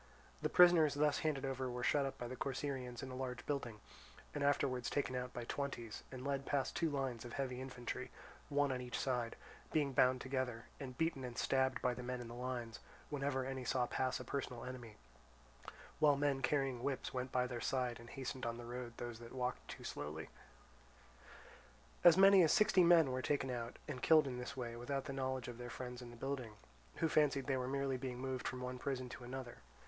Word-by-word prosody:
The - - +1
prisoners 170 -5 +7
thus 150 0 +3
handed 145 -3 0
over 130 -1 -2
were 125 0 -4
shut 140 +1 +3
up 135 - -6
by 120 - -4
the 130 - -5
Corcyraeans 130 -2 -3
in 130 - -5
a - - -5
large 125 -1 -4
building, 125 -7 -2 0.5
and 145 - -1
afterwards 130 -3 +2
taken 140 -3 0
out 125 0 -2
by 120 - -5
twenties 120 -4 -4
and 130 0 -7
led 140 -1 0
past 140 -2 0
two 165 - +2
lines 135 -5 -2
of 120 -1 -8
heavy 130 -2 -2
infantry, 130 0 -5 0.4
one 145 -1 +2
on 130 -1 -2
each 125 -1 -4
side, 125 -3 -1 0.4
being 145 -3 +2
bound 130 0 +5
together, 130 -3 -2
and 130 -3 -6
beaten 160 -5 0
and 125 -2 -6
stabbed 130 0 +2
by 125 - +3
the 125 - -6
men 125 0 -3
in 120 - -6
the - - -7
lines 120 -2 -4 0.3
whenever 140 -2 0
any 130 -1 -3
saw 125 0 +1
pass 130 +1 0
a - - -5
personal 125 -3 -4
enemy; 120 -4 -7 1.0
while 150 -2 +6
men 140 -1 +1
carrying 135 -3 +1
whips 135 0 -2
went 130 0 -2
by 125 0 +2
their 120 -2 -4
side 125 -3 0
and 120 0 -11
hastened 130 -1 -5
on 115 0 -1
the 120 - -7
road 120 0 -5
those 120 -2 -5
that 120 0 -10
walked 125 0 -2
too - - -8
slowly. 75 +2 -5 1.7
As 175 -1 +9
many 195 0 +9
as 160 - +5
sixty 210 -3 +6
men 170 -5 +7
were 130 0 -1
taken 135 -1 0
out 120 -1 -4
and 125 - -4
killed 155 -2 +6
in 125 -2 -3
this 135 +3 -5
way 120 -2 -3
without 135 +3 -3
the 140 - -4
knowledge 130 -2 -2
of 120 -1 -7
their 120 0 -5
friends 125 0 -6
in 120 - -8
the 120 - -10
building, 130 -3 -3 0.4
who 165 - +1
fancied 145 -4 +3
they 135 - +1
were 125 -1 -1
merely 135 0 0
being 125 -1 -4
moved 130 0 -3
from 130 -1 -4
one 125 0 -4
prison 130 -1 -2
to 125 - -8
another. 125 0 -6
130 Hz, 210 wpm, -38 LUFS, 125-140 Hz, 1.7 s, As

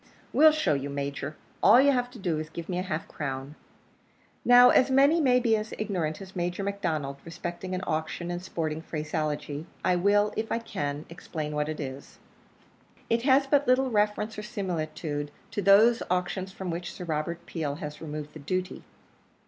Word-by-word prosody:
"We'll 310 +1 +7
show 305 - +1
you, 140 0 -2
Major. 140 +1 -4 0.3
All 220 +5 +8
you've 260 -3 +3
to 250 - -12
do 175 -7 -1
is 155 - -4
to 155 - -23
give 170 -1 -6
me 180 - -1
half 180 -2 -2
a - - -23
crown." 135 -1 -5 0.9
Now, 245 0 +8
as 255 - +4
many 280 +5 +5
may 250 -3 +4
be 235 -2 +3
as 215 0 -4
ignorant 180 -8 -2
as 190 0 -13
Major 175 +2 -2
McDonnell 155 -9 -2
respecting 175 +2 -5
an 185 - -4
auction 160 +2 -2
in 175 - -3
sporting 160 -3 -3
phraseology, 155 -1 -3 0.2
I 180 -1 +4
will, 205 +3 +3
if 220 0 -3
I - - +2
can, 145 -10 -4
explain 155 -2 -5
what 150 0 -1
it 155 - -4
is. 135 -1 -7 0.9
It 230 0 +3
has 270 +2 +4
but 285 +1 +2
little 255 +1 +3
reference 210 0 0
or - - -3
similitude 160 -8 -3 0.2
to 205 - -2
those 215 +5 +6
auctions 180 +1 -1
from 190 -2 -5
which 175 +1 -4
Sir - - -8
Robert 165 +1 -3
Peel 150 -4 -3
has 150 -2 -7
removed 150 -1 -6
the 155 - -9
duty. 185 +5 -3
175 Hz, 180 wpm, -28 LUFS, 155-215 Hz, 0.9 s, All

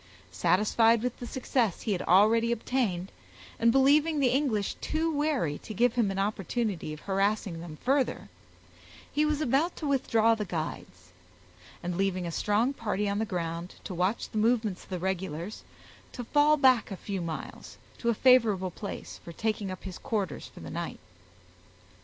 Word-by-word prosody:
Satisfied 215 - +3
with 250 -1 -3
the 245 - -6
success 240 -6 -1
he 220 - -2
had 185 - 0
already 225 +5 +4
obtained, 220 -6 -1 0.5
and 230 0 +5
believing 290 +4 +4
the 265 -3 +4
English 250 -7 0
too 320 +1 -1
wary 285 - 0
to 215 - -8
give 240 +3 +3
him 235 -5 +2
an 195 - -3
opportunity 200 -3 -2
of 155 - -8
harassing 195 -3 0
them 165 -3 -9
further, 270 +1 +1 0.8
he 300 +1 +2
was 300 0 0
about 300 +5 +1
to 310 - -6
withdraw 230 -5 +3
the 220 -1 -2
guides; 155 - -6 0.7
and, 175 0 -3
leaving 190 -2 0
a 170 - -3
strong 215 - +1
party 210 -5 -2
on 200 +1 -1
the 220 - 0
ground 170 -2 -4
to 190 - -6
watch 185 +6 0
the 215 - -1
movements 220 -4 +1
of - - -20
the 185 - -3
regulars, 185 0 -3 0.5
to 245 - -5
fall 295 +4 +4
back 260 -5 +4
a 195 - -5
few 195 -1 -4
miles, 165 -2 -7 0.2
to 235 - 0
a 235 - +2
favorable 215 -8 +4
place 200 +3 -7
for 170 - -8
taking 210 +2 -2
up 185 - -7
his 185 -2 -7
quarters 210 -8 -3
for - - -13
the - - -8
night. 170 0 -4
215 Hz, 170 wpm, -29 LUFS, 185-250 Hz, 0.8 s, and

